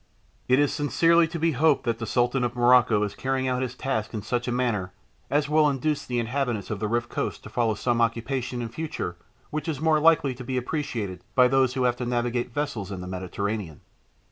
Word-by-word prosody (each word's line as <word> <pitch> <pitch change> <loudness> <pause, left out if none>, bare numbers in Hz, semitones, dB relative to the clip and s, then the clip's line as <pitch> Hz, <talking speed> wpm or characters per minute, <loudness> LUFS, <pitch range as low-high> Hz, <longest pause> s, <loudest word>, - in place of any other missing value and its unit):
It 130 - +4
is 145 0 +2
sincerely 165 +3 +3
to 165 +1 -5
be 165 +1 +2
hoped 150 +1 +3
that 115 -1 -1
the 115 - -4
Sultan 125 +3 +1
of 120 0 -1
Morocco 120 -3 +5
is 105 - -2
carrying 130 0 -1
out 125 0 0
his 125 -1 -3
task 120 -5 -2
in 105 - -4
such 120 0 -2
a - - 0
manner 115 -7 -1 0.4
as 145 0 +1
will 150 0 +4
induce 145 +2 -1
the 125 - -2
inhabitants 120 -3 -2
of 105 - -3
the 105 - -1
Riff 120 +2 0
coast - - -4
to - - -10
follow 115 -3 +1
some 120 +2 0
occupation 120 +2 -1
in 115 - -4
future 150 - -4 0.4
which 155 0 -3
is 155 -4 -2
more 155 0 +3
likely 155 -3 +4
to 125 +1 -9
be 130 +1 -3
appreciated 120 - -3
by 125 -1 +6
those 130 0 +2
who 130 - 0
have 125 -1 +2
to 125 - -3
navigate 120 0 -1
vessels 115 -8 -3
in 95 -2 -5
the 90 - -7
Mediterranean. 95 -1 -4
125 Hz, 220 wpm, -26 LUFS, 115-140 Hz, 0.4 s, by